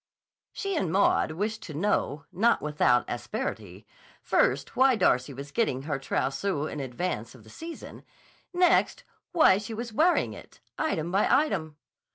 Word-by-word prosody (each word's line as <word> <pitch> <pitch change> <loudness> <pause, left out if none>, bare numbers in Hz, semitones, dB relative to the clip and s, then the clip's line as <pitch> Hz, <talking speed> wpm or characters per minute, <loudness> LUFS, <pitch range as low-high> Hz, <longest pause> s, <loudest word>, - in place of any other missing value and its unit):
She 395 -1 -3
and 185 - -1
Maud 190 -4 +2
wished 215 +5 -3
to 155 -8 -8
know, 150 -5 -1
not 225 +6 +3
without 150 -5 +2
asperity, 105 -4 -5 0.4
first 135 +2 +1
why 260 0 +5
Darcy 130 - +2
was 140 +2 -8
getting 140 - 0
her 145 -2 -3
trousseau 140 +4 -1
in 150 - -5
advance 130 -3 -4
of 120 - -16
the 110 - -16
season; 330 0 -9 0.5
next, 360 0 +2 0.3
why 255 - +5
she 220 +2 -6
was 235 0 -6
wearing 335 +9 +2
it, - - -14 0.2
item 170 - -2
by 195 +3 +2
item. 160 - +1
160 Hz, 150 wpm, -27 LUFS, 135-225 Hz, 0.5 s, why